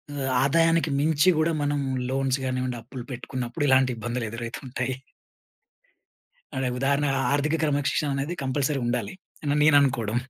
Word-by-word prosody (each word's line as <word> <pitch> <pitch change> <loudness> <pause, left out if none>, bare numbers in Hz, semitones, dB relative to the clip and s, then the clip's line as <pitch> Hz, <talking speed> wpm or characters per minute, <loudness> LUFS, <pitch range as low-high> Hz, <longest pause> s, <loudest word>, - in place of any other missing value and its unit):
ఆహ్, 135 -2 -2
ఆదాయానికి 165 +3 +3
మించి 155 +3 +3
గూడా 155 +1 +2
మనం 145 0 0 0.3
లోన్స్ 135 0 0
గానివ్వండి, 130 -1 -2
అప్పులు 120 +2 -8
పెట్టుకున్నప్పుడు 125 +2 -4
ఇలాంటి 130 -1 +4
ఇబ్బందులు 120 +1 -3
ఎదురవుతుంటాయి. 120 +3 -4 1.6
అదే 130 -1 0
ఉదాహరణ 140 +2 +1 0.3
ఆర్థిక 145 +2 +1
క్రమశిక్షణ 145 0 +1
అనేది 140 +6 -2
కంపల్సరీ 135 +1 0
ఉండాలి 120 - -2 0.3
అని 145 -1 +1
నేను 155 -1 +6
అనుకోవడం. 120 -6 0
135 Hz, 130 wpm, -25 LUFS, 125-145 Hz, 1.6 s, నేను